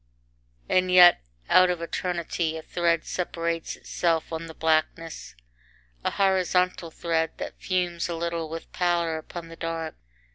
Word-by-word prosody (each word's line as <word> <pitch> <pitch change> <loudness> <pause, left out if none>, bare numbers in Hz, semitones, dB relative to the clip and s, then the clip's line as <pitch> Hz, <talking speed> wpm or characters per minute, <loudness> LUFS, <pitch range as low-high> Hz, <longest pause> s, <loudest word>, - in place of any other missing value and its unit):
IX - - 0
And 185 0 -1
yet 180 -1 +8 0.3
out 185 0 +6
of 175 -1 -1
eternity 170 -1 -2
a 160 - -8
thread 170 -1 0
separates 170 -2 -2
itself 165 -1 -1
on 165 +1 -4
the 160 - -10
blackness, 160 - -1 0.7
a - - +1
horizontal 185 -3 +1
thread 160 0 -1
that - - -7
fumes 175 -2 -1
a 170 - -2
little 170 -1 -3
with 165 +1 -7
pallor 170 -3 0
upon 165 +1 -9
the 165 - -10
dark. 165 -1 -4
170 Hz, 145 wpm, -26 LUFS, 165-175 Hz, 0.7 s, yet